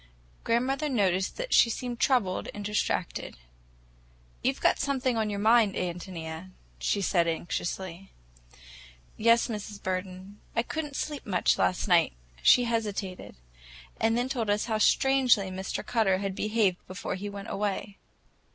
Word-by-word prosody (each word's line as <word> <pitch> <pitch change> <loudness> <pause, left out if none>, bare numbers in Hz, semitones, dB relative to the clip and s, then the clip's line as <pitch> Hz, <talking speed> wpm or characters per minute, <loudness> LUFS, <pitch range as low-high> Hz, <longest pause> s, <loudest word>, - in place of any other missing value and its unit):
Grandmother 265 +6 0
noticed 190 -7 +1
that - - -3
she 235 - +6
seemed 240 0 -4
troubled 235 -10 +1
and 205 0 -6
distracted. 210 -3 -2 1.0
"You've - - 0
got - - +3
something 265 -3 0
on 220 -1 0
your 205 - -3
mind, 220 0 +4
Ántonia," 175 -1 -5 0.3
she 200 - 0
said 175 -3 +2
anxiously. 175 +2 -4 1.0
"Yes, 230 +2 +4
Mrs. 210 -3 -6
Burden. 185 +2 -5
I 230 - +2
could 315 +5 -3
n't 290 -2 -10
sleep 295 -3 -4
much 185 -3 +2
last 185 - +1
night." 175 - +4 0.3
She 245 - +6
hesitated, 210 -5 -3 0.6
and 225 +1 +2
then 245 +1 0
told 240 -5 -2
us 205 +1 +1
how 220 -2 -1
strangely 250 -5 +3
Mr. 190 +1 -4
Cutter 215 -6 +2
had 195 0 -3
behaved 210 -2 +1
before 185 +1 -5
he 200 +2 -5
went 200 0 -7
away. 205 0 -3
205 Hz, 140 wpm, -28 LUFS, 185-235 Hz, 1.0 s, she